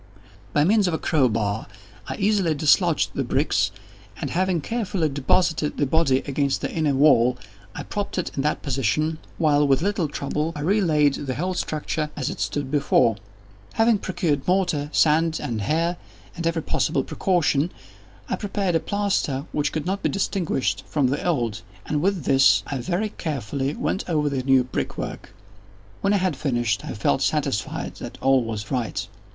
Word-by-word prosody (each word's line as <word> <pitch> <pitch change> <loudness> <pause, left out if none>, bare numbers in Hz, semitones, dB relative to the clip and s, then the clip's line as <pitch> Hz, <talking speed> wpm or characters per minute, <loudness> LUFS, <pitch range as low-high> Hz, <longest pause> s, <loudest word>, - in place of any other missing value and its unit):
By 145 - +3
means 205 +3 +3
of 170 - 0
a - - 0
crow 145 -7 +2
bar 110 -1 -1 0.4
I - - -3
easily 195 -6 +1
dislodged 155 +3 +3
the - - -1
bricks, - - +1 0.5
and, - - -3
having 185 -1 +1
carefully 190 -3 -1
deposited 150 +3 +1
the 145 - +2
body 135 -2 +2
against 140 -1 0
the - - -3
inner 155 -4 +1
wall, 125 -3 +5 0.4
I - - -5
propped 205 -2 -4
it 180 - -2
in 135 - 0
that 150 +2 -1
position, 145 +4 0 0.2
while, 150 -3 +3
with 135 +3 +3
little 195 -4 0
trouble, 150 +3 -2
I 150 - -5
re 200 +8 +2
laid 150 -5 +2
the 130 - -2
whole 180 +5 -1
structure 155 -2 -2
as 135 - -2
it - - -6 0.2
originally 145 +1 0
stood. 115 -6 +3 0.5
Having 225 -2 +3
procured 155 -8 -1
mortar, 175 -6 +1
sand, 160 +1 +3
and 120 -7 -3
hair, 165 - 0 0.4
with 170 -1 -2
every 165 -1 -1
possible 135 - 0
precaution, 170 -3 +1 0.6
I - - -1
prepared 195 -3 -1
a 165 - +3
plaster 190 -9 -1
which 150 - 0
could 155 -1 -3
not 195 +2 -2
be - - +1
distinguished 190 -8 -1
from 140 -4 +1
the 140 - -2
old, 120 -11 -1 0.2
and 150 -1 -1
with 190 -2 0
this 135 0 +5
I 140 - -4
very 185 - -1
carefully 140 - -3
went 190 - -2
over 150 -3 +1
the 135 -2 -1
new 130 0 +4
brickwork. 125 - -5 0.7
When 195 - +2
I - - +4
had 185 -4 0
finished, 120 -7 -1
I - - -5
felt - - +1
satisfied - - -1
that - - -8
all 135 -1 +3
was 110 -2 -5
right. 125 -4 -2
150 Hz, 175 wpm, -24 LUFS, 135-175 Hz, 0.7 s, wall